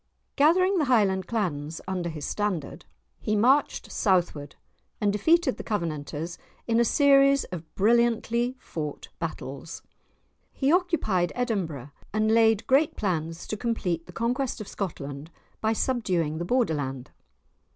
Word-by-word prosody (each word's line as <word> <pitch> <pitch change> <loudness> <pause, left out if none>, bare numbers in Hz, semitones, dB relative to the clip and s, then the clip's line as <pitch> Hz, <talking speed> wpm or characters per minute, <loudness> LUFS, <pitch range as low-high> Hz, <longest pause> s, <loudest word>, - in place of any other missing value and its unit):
Gathering 365 +6 +4
the 300 - +2
Highland 200 -7 +2
Clans 160 -9 -2
under 180 -2 -2
his 155 -3 -6
standard, 195 -9 -3 0.3
he 215 - -1
marched 260 +7 +2
Southward 175 - 0 0.4
and 205 -1 +1
defeated 320 - +3
the - - -6
Covenanters 165 -4 -3 0.3
in 230 0 +2
a - - +5
series 275 +2 +5
of 165 -3 -7
brilliantly 235 +3 +2
fought 150 - -6
battles. 150 -1 -6 0.7
He 275 +1 +1
occupied 320 - +1
Edinburgh, 175 - -2 0.2
and 215 +1 +2
laid 225 -2 +4
great 280 +4 +3
plans 165 -4 -2
to - - -3
complete 195 -8 -2
the - - -10
conquest 245 +3 -1
of 215 - -7
Scotland 145 -5 -5 0.3
by 220 - +2
subduing 180 - 0
the 170 - -2
Borderland. 145 - -1
205 Hz, 130 wpm, -26 LUFS, 165-240 Hz, 0.7 s, a